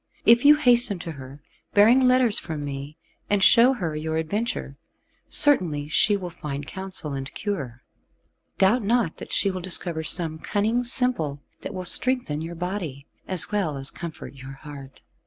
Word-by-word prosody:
If 235 +3 +5
you 295 +1 +8
hasten 240 -8 +2
to 170 -1 -7
her, 140 0 -12 0.3
bearing 220 +5 +5
letters 250 -3 +3
from 150 -2 -6
me, 140 +2 -7 0.3
and 205 -1 +1
show 240 +6 +6
her 170 -11 -4
your 160 +1 -3
adventure, 160 -4 -4 0.5
certainly 170 - +5
she 205 +6 +2
will 180 -3 -7
find 145 -4 -7
counsel 185 -3 -4
and 135 0 -6
cure. 140 - -5 0.7
Doubt 200 +6 +3
not 220 -4 -1
that - - -11
she 200 - +1
will 185 -1 -6
discover 175 -2 0
some 160 0 -2
cunning 220 +7 -1
simple, 235 - -2 0.2
that 200 - -7
will 185 -1 -6
strengthen 240 - +2
your 165 +1 -7
body, 170 -6 -6 0.2
as 185 0 +2
well 185 -9 -2
as 135 +1 -2
comfort 165 -5 -9
your 135 0 -11
heart. 140 -1 -12
175 Hz, 160 wpm, -23 LUFS, 150-210 Hz, 0.7 s, you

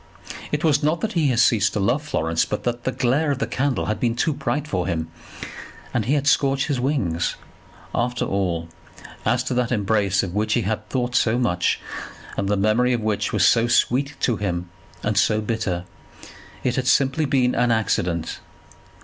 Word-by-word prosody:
It 150 - -1
was 150 -3 +3
not 155 +3 +1
that 220 - -2
he 165 -5 +2
had 125 -3 +1
ceased 115 -3 +4
to - - -1
love 120 +9 +1
Florence; 80 - 0
but 105 - -3
that 120 0 -2
the 130 - +1
glare 135 +5 +1
of 140 - 0
the - - -1
candle 135 0 -1
had 110 - -2
been 115 -2 0
too 155 +5 +1
bright 145 +1 -2
for 90 -8 -1
him 80 -3 -2 0.8
and 115 -4 0
he 135 +6 +2
had 145 -1 0
scorched 140 -1 +3
his 140 -5 -1
wings. 110 - 0 0.6
After 125 +1 0
all, 90 -4 -1 0.6
as 120 +3 +2
to 130 - -2
that 125 -1 0
embrace 100 -3 +1
of 90 -2 -4
which 105 +1 0
he 120 - +2
had 105 +1 -3
thought 125 -2 -1
so 120 -1 +3
much, 90 -8 +1 0.6
and 100 - -1
the 105 - +2
memory 110 +5 +2
of 120 - -1
which 105 -1 -1
was - - +3
so 115 0 +4
sweet 135 +4 +2
to 120 -4 +1
him 90 -3 -3 0.3
and 105 -1 +2
so 110 0 +3
bitter, 105 -5 -2 0.8
it 125 0 0
had 130 -1 -1
simply 135 +4 +3
been 130 -3 +2
an 120 0 +2
accident. 90 -7 0
120 Hz, 190 wpm, -23 LUFS, 100-130 Hz, 0.8 s, ceased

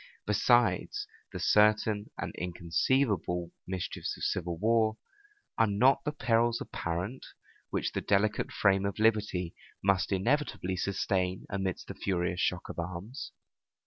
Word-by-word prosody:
Besides 415 0 +2 0.3
the - - -5
certain 105 0 +3
and - - -4
inconceivable 90 - 0 0.2
mischiefs 95 -1 -3
of - - -8
civil 85 -1 -1
war, 110 +2 +2 0.6
are 115 - +5
not 125 +7 +4
the 150 - 0
perils 120 -4 +2
apparent, 90 +10 -4 0.5
which - - -1
the - - -2
delicate 100 +1 +1
frame 95 -1 +3
of 100 - -4
liberty 105 -6 +1 0.3
must 100 0 +2
inevitably 100 -2 0
sustain 95 -1 -1
amidst 95 -2 -2
the - - -5
furious 90 -2 -1
shock 90 -2 0
of - - -6
arms? 95 - -5
100 Hz, 125 wpm, -30 LUFS, 90-115 Hz, 0.6 s, are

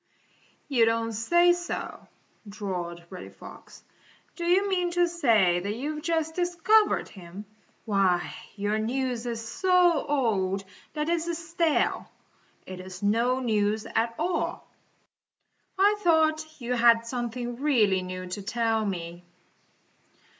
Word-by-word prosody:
"You 250 -6 +3
don't 230 0 0
say 345 +11 +4
so," 350 0 -5 0.4
drawled 180 -4 -5
Reddy 185 -1 -8
Fox. - - -14 0.5
"Do 345 - -6
you 375 +4 +3
mean 360 -2 0
to 350 0 +3
say 225 - +3
that 200 +4 -3
you've 300 +5 -4
just 320 -1 -1
discovered 360 +5 +2
him? 185 +2 -10 0.4
Why, 195 -5 +1 0.2
your 205 +1 -1
news 245 +1 -2
is 230 -1 -4
so 360 +1 +3
old 200 -9 0 0.3
that 300 0 -2
it 340 - +2
is 340 -1 -3
stale; 335 -3 0 0.6
it 185 -1 -8
is 185 +1 -9
no 235 +5 +2
news 215 -2 0
at 230 +1 0
all. 355 -2 -2 1.1
I 405 +2 +4
thought 315 -4 +1
you 245 0 -2
had 235 -1 +4
something 240 0 -4
really 215 -10 +3
new 185 0 -6
to 180 +3 -6
tell 225 +1 0
me." 175 -3 -5
235 Hz, 125 wpm, -27 LUFS, 205-320 Hz, 1.1 s, say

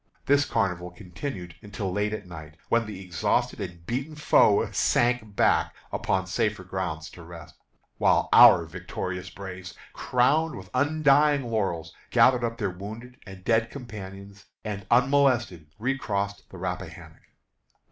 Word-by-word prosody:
This 145 +1 +4
carnival 90 -5 -1
continued 90 - -7
until 100 -2 -5
late 105 +2 -1
at 105 -2 -5
night, 80 -3 -11
when 115 -1 +2
the 95 -3 -8
exhausted 105 +7 0
and 85 -3 -7
beaten 135 - -3
foe 150 -8 +4
sank 120 -4 +1
back - - +2 0.2
upon 95 -1 -1
safer 105 +2 -1
grounds 90 -4 -4
to 90 - -12
rest, 85 0 -11 0.5
while - - +3
our 85 - +8
victorious 90 +2 -6
braves, 95 -1 -9 0.2
crowned 145 +5 +1
with 95 0 -11
undying 145 +1 +3
laurels, 100 -8 -2 0.2
gathered 125 -1 +4
up 115 0 -2
their 105 -5 -1
wounded 110 +7 -9
and 95 -1 -11
dead 115 0 +2
companions, 100 -5 -10 0.2
and, 100 -2 -5
unmolested, 125 - +2
recrossed 105 -5 -2
the - - -11
Rappahannock. - - -6
100 Hz, 135 wpm, -26 LUFS, 90-125 Hz, 0.5 s, our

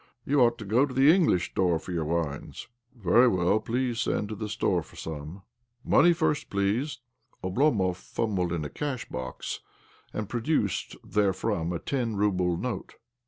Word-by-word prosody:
You 140 -1 +3
ought 120 -1 +4
to 110 - -8
go 120 +8 +3
to 130 - -8
the 135 +4 +7
English 160 - +2
Store 90 -3 +2
for 85 - -8
your 85 -3 -1
wines." 80 -3 -3 0.2
" 125 +2 -42
Very 115 +3 +4
well. 95 -1 +2
Please 120 +2 -1
send 105 -2 0
to 110 - -4
the 105 +1 -5
Store - - +1
for - - -15
some." 80 +4 -7 0.2
" 120 +1 -46
Money 175 - +6
first, 160 -3 0
please! 105 +9 0 0.2
" - - -39
Oblomov 95 -3 +2
fumbled 95 -3 -2
in 80 -3 -2
a - - -4
cashbox, 125 - -4 0.5
and 110 -2 -4
pro 120 +3 -2
^ - - -9
duced 115 - 0
therefrom 100 -3 0
a 85 - -1
ten 120 +1 -2
rouble 90 -4 +1
note. 125 +5 -4
105 Hz, 180 wpm, -28 LUFS, 90-125 Hz, 0.5 s, the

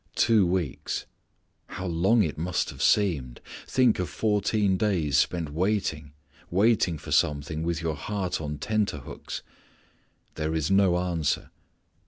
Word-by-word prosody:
Two 110 -5 +4
weeks. 90 -6 -2 0.6
How 90 - -6
long 95 +6 +3
it 80 - -2
must 85 +3 -1
have - - -9
seemed! 75 -12 +2 0.3
Think 125 -6 +3
of 90 - -2
fourteen 105 -2 +1
days 90 -8 0
spent 85 -1 +1
waiting; 80 -5 -1 0.4
waiting 100 -3 +2
for - - -9
something, 75 +1 +1
with 85 0 -2
your 80 -2 -1
heart 90 +4 -3
on 75 -1 -4
tenter 105 +1 -1
hooks. - - -7 0.9
There 80 +1 -2
is 80 +2 0
no 95 -3 +4
answer. 85 -4 -1
90 Hz, 135 wpm, -27 LUFS, 80-100 Hz, 0.9 s, Two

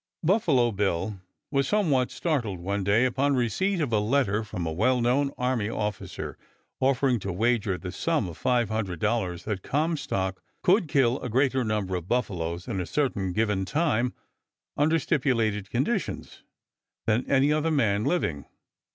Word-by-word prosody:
Buffalo 155 - +3
Bill 100 -1 -1 0.3
was 140 -2 +1
somewhat 150 -12 +2
startled 120 - -2
one 100 +3 -2
day 105 +6 +3
upon 135 +3 +1
receipt 170 - 0
of 135 -6 -1
a 105 - +4
letter 110 -1 +1
from 90 -5 -5
a 80 - -2
well 125 +10 +2
known 130 +4 +2
army 125 -4 0
officer, 105 -3 -4 0.4
offering 130 -2 +2
to 95 0 -4
wager 110 -1 +1
the 90 +1 -6
sum 135 - 0
of 85 - -10
$500 110 -6 0
that 105 -3 -3
Comstock 140 - -1 0.2
could 185 -1 +4
kill 135 -4 +2
a 125 - -5
greater 130 +2 +2
number 105 -4 -1
of 90 -1 -4
buffaloes 90 -8 -2
in 95 - -2
a 90 - -5
certain 110 -10 0
given 105 -1 0
time, 125 - 0 0.6
under 155 +3 +3
stipulated 115 -10 0
conditions, 160 - -2 0.6
than 115 +3 +2
any 140 +2 +4
other 155 +1 +1
man 110 -9 +2
living. 85 - -1
115 Hz, 150 wpm, -27 LUFS, 100-140 Hz, 0.6 s, a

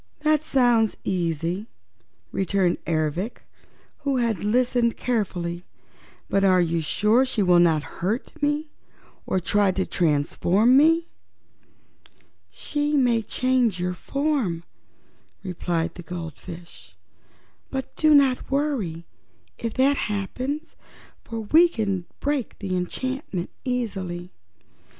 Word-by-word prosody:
"That 305 -1 +3
sounds 240 -7 +2
easy," 175 +2 -1 0.6
returned 190 -2 +1
Ervic, 165 +7 -1 0.6
who 280 -2 0
had 230 -7 0
listened 240 +1 +2
carefully. 180 -7 -2 0.6
"But 195 - +1
are 185 -2 +5
you 170 -1 +1
sure 210 - +3
she 250 -5 0
will 180 -1 +5
not 160 -3 +4 0.2
hurt 210 +8 -1
me, 295 +1 0 0.6
or 190 - +1
try 200 +2 +2
to 190 0 0
transform 175 - +2
me?" 325 +4 +5 1.4
"She 295 0 -1
may 245 -4 +3
change 245 -3 +1
your 180 0 -1
form," 265 - -1 0.8
replied 175 -2 -2
the 180 - -9
goldfish, 170 0 -9 0.7
"but 265 -1 -5
do 310 -1 +5
not 270 -3 +3
worry 255 - -1 0.5
if 230 -1 -3
that 275 +2 +3
happens, 255 +10 -3 0.5
for 230 -1 -5
we 320 +11 +5
can 195 - -2
break 285 -4 -2
that 195 -2 -5
enchantment 185 - -3
easily. 190 -9 -3
210 Hz, 110 wpm, -24 LUFS, 175-260 Hz, 1.4 s, are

